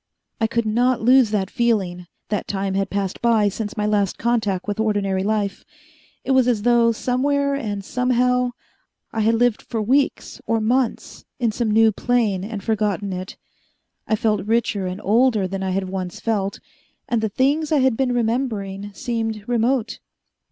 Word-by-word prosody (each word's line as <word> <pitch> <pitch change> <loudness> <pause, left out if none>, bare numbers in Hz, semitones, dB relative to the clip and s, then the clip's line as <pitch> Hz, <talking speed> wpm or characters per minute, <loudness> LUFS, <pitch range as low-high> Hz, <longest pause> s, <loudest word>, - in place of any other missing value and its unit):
I 225 - +2
could 235 0 -1
not 240 +3 +2
lose 250 -1 +5
that 200 -2 -1
feeling 195 -8 0 0.2
that 210 - -2
time 195 -1 -2
had 195 0 -1
passed 195 -2 -3
by 225 -3 +3
since 210 +2 -5
my 210 - 0
last 205 -2 +1
contact 220 -6 0
with 205 +1 -3
ordinary 205 -3 0
life. 205 -1 -1 0.6
It 270 - -2
was 260 -2 +4
as 225 -5 +1
though, 235 -1 +4
somewhere 280 +4 0
and 205 -8 -3
somehow, 250 0 +1 0.6
I 225 - -2
had 220 +1 +3
lived 240 -1 +2
for 230 - -4
weeks 265 +6 0
or 230 0 +1
months 240 +3 -1
in 235 -3 +1
some 225 +1 -1
new 220 +1 +5
plane, 215 -4 0
and 205 -1 -6
forgotten 205 -3 -1
it. 185 +1 -6 0.7
I 220 - +2
felt 210 -2 0
richer 215 -4 0
and 185 +2 -5
older 220 -1 +3
than 195 +1 -4
I 190 - -1
had 190 0 -1
once 185 -2 -5
felt, 200 -3 -1 0.5
and 235 -2 0
the 220 - 0
things 285 +8 +1
I 300 -3 +3
had 260 -3 +3
been 260 +1 0
remembering 220 -5 -2
seemed 225 -3 -3
remote. 240 0 0
220 Hz, 170 wpm, -22 LUFS, 200-245 Hz, 0.7 s, lose